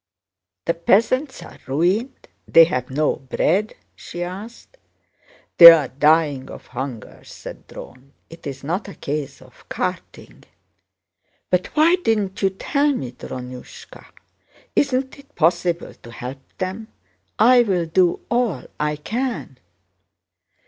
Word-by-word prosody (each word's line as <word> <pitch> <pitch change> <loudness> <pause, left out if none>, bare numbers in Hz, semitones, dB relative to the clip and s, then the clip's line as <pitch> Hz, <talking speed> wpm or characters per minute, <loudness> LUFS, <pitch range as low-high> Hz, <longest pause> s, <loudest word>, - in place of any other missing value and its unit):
"The 170 - +1
peasants 225 - +1
are - - -13
ruined? 185 - -1 0.2
They 165 - +8
have 125 -6 -2
no 150 +3 0
bread?" 175 +10 -1 0.2
she 175 +1 -7
asked. 210 - -9 0.8
"They're 165 -6 +10
dying 145 -1 +2
of - - -11
hunger," 130 -5 -7
said - - -11
Dron. 130 +2 -12 0.2
"It's 140 -5 -9
not 175 +9 -3
a 200 - -10
case 140 -2 -5
of 130 -1 -21
carting." - - -6 1.1
"But 180 0 +1
why 325 +4 +5
didn't 210 - -1
you 195 - +3
tell 280 +9 0
me, 130 - -4
Drónushka? 125 0 -10 0.7
Isn't 265 -1 0
it 280 +1 -19
possible 170 +1 0
to 120 - -15
help 125 +3 -8 0.2
them? 190 +4 -4 0.5
I'll 220 -6 +4
do 175 +2 +1
all 235 - 0 0.2
I 150 0 0
can...." 225 - -4
170 Hz, 115 wpm, -21 LUFS, 140-225 Hz, 1.1 s, They're